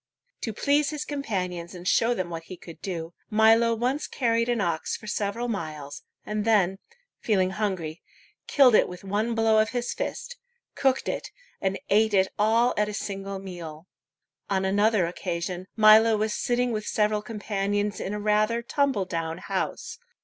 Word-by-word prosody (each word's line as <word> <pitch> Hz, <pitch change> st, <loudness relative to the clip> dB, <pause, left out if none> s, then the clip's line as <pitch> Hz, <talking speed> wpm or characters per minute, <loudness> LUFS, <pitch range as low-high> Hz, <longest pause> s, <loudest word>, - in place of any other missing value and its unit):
To 225 Hz, -, -2 dB
please 285 Hz, +6 st, +2 dB
his 300 Hz, -1 st, -4 dB
companions 185 Hz, -, -3 dB
and 180 Hz, 0 st, -7 dB
show 235 Hz, +4 st, +3 dB
them 180 Hz, -4 st, -3 dB
what 165 Hz, 0 st, -6 dB
he 185 Hz, -, -9 dB
could 165 Hz, -1 st, -12 dB
do, 170 Hz, -3 st, -5 dB, 0.2 s
Milo 225 Hz, +1 st, +4 dB
once 255 Hz, +6 st, -1 dB
carried 230 Hz, -2 st, 0 dB
an 240 Hz, -1 st, +1 dB
ox 170 Hz, -5 st, -1 dB
for -, -, -14 dB
several 210 Hz, +3 st, -2 dB
miles, 155 Hz, -9 st, -5 dB, 0.2 s
and 210 Hz, 0 st, -2 dB
then, 195 Hz, -4 st, +2 dB, 0.4 s
feeling 190 Hz, -4 st, +1 dB
hungry, 185 Hz, -6 st, -3 dB, 0.5 s
killed 265 Hz, -4 st, +6 dB
it -, -, +5 dB
with 180 Hz, +1 st, -9 dB
one 210 Hz, +4 st, -1 dB
blow 225 Hz, -1 st, +4 dB
of 215 Hz, -, +2 dB
his 245 Hz, -1 st, -2 dB
fist, -, -, -5 dB, 0.4 s
cooked 265 Hz, -1 st, +1 dB
it, -, -, -3 dB, 0.3 s
and 195 Hz, 0 st, 0 dB
ate 215 Hz, +1 st, +4 dB
it 190 Hz, 0 st, +3 dB
all 230 Hz, +3 st, +3 dB
at 210 Hz, 0 st, +1 dB
a 210 Hz, -, -5 dB
single 195 Hz, -1 st, -4 dB
meal. 175 Hz, -4 st, -8 dB, 0.6 s
On 190 Hz, -1 st, +1 dB
another 205 Hz, 0 st, +3 dB
occasion, 175 Hz, +1 st, -4 dB
Milo 220 Hz, +1 st, +7 dB
was 215 Hz, 0 st, 0 dB
sitting 245 Hz, 0 st, 0 dB
with 215 Hz, -2 st, -3 dB
several 210 Hz, 0 st, +1 dB
companions 205 Hz, -1 st, -2 dB
in 190 Hz, -, -4 dB
a -, -, -3 dB
rather 215 Hz, +3 st, +1 dB
tumble 270 Hz, -6 st, 0 dB
down 165 Hz, -2 st, -3 dB
house. 190 Hz, +1 st, -4 dB
210 Hz, 165 wpm, -26 LUFS, 185-230 Hz, 0.6 s, Milo